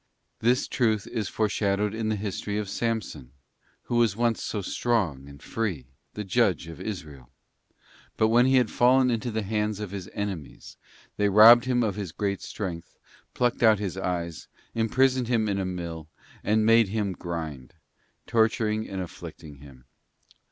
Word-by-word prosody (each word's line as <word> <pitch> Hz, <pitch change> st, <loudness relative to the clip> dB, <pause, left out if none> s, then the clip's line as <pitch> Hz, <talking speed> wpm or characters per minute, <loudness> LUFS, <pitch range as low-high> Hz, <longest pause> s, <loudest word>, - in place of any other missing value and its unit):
This 125 Hz, +3 st, +2 dB
truth 110 Hz, -5 st, +1 dB
is 110 Hz, -5 st, -3 dB
foreshadowed 105 Hz, -1 st, 0 dB
in 110 Hz, 0 st, -2 dB
the 110 Hz, -, +1 dB
history 100 Hz, 0 st, -4 dB
of 105 Hz, -1 st, -2 dB
Samson, 110 Hz, -, -3 dB, 0.5 s
who 120 Hz, -, -2 dB
was 115 Hz, -4 st, +3 dB
once 115 Hz, -1 st, +1 dB
so 105 Hz, -3 st, -3 dB
strong 90 Hz, -, -1 dB
and 70 Hz, 0 st, -13 dB
free, 100 Hz, -, -3 dB, 0.3 s
the 105 Hz, -, -4 dB
judge 100 Hz, -3 st, +1 dB
of 80 Hz, -3 st, -9 dB
Israel. 75 Hz, -, -7 dB, 0.9 s
But 110 Hz, -, +3 dB
when 120 Hz, +3 st, +5 dB
he 130 Hz, -, +4 dB
had 125 Hz, -4 st, +3 dB
fallen 125 Hz, +1 st, +4 dB
into 115 Hz, +1 st, -2 dB
the 110 Hz, -1 st, -2 dB
hands 105 Hz, 0 st, -1 dB
of 105 Hz, -3 st, -5 dB
his 95 Hz, -3 st, -6 dB
enemies, 95 Hz, -8 st, -6 dB, 0.4 s
they 105 Hz, 0 st, +2 dB
robbed 115 Hz, +4 st, +8 dB
him 125 Hz, -1 st, +1 dB
of 105 Hz, -2 st, -1 dB
his 100 Hz, -5 st, -4 dB
great 100 Hz, +2 st, -2 dB
strength, 90 Hz, -6 st, -6 dB, 0.4 s
plucked 120 Hz, -1 st, 0 dB
out 110 Hz, -2 st, +6 dB
his 100 Hz, -3 st, -4 dB
eyes, 85 Hz, -4 st, -4 dB, 0.3 s
imprisoned 125 Hz, +2 st, +2 dB
him 115 Hz, -3 st, +1 dB
in 100 Hz, -1 st, -1 dB
a 95 Hz, -, -1 dB
mill, 85 Hz, -4 st, -5 dB, 0.4 s
and 110 Hz, +1 st, +2 dB
'made 115 Hz, -1 st, +5 dB
him 105 Hz, 0 st, -1 dB
grind,' 80 Hz, -8 st, -6 dB, 0.5 s
torturing 110 Hz, -1 st, +1 dB
and 95 Hz, -1 st, -4 dB
afflicting 75 Hz, -4 st, -10 dB
him. 70 Hz, -2 st, -15 dB
105 Hz, 160 wpm, -26 LUFS, 90-115 Hz, 0.9 s, robbed